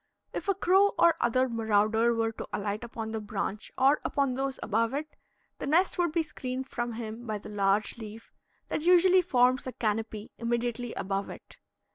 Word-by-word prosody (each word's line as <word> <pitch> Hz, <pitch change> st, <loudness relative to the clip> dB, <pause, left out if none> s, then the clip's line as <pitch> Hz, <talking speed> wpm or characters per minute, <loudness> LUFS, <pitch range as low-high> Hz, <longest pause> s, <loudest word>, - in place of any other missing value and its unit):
If -, -, -5 dB
a 395 Hz, -, +2 dB
crow 390 Hz, +2 st, +4 dB
or 340 Hz, -, +6 dB
other 255 Hz, +2 st, +2 dB
marauder 220 Hz, 0 st, +2 dB
were 225 Hz, 0 st, 0 dB
to 225 Hz, -, -8 dB
alight 205 Hz, +2 st, -3 dB
upon 225 Hz, -1 st, -5 dB
the 220 Hz, -1 st, -3 dB
branch 205 Hz, 0 st, -4 dB
or 275 Hz, +3 st, +4 dB
upon 275 Hz, -2 st, 0 dB
those 270 Hz, +1 st, -3 dB
above 230 Hz, +4 st, 0 dB
it, 305 Hz, +2 st, -5 dB, 0.4 s
the -, -, -4 dB
nest 350 Hz, +5 st, +2 dB
would 345 Hz, -2 st, +2 dB
be 330 Hz, 0 st, +1 dB
screened 260 Hz, -3 st, -5 dB
from 240 Hz, -3 st, -3 dB
him 225 Hz, +1 st, -6 dB
by 215 Hz, -1 st, -2 dB
the 205 Hz, -, -10 dB
large 205 Hz, +2 st, +1 dB
leaf 220 Hz, 0 st, -10 dB, 0.4 s
that -, -, -1 dB
usually 360 Hz, +2 st, +6 dB
forms 255 Hz, -6 st, +2 dB
a -, -, -3 dB
canopy 220 Hz, -1 st, -3 dB
immediately 240 Hz, 0 st, -2 dB
above 195 Hz, +1 st, -2 dB
it. -, -, -12 dB
235 Hz, 180 wpm, -29 LUFS, 220-275 Hz, 0.4 s, or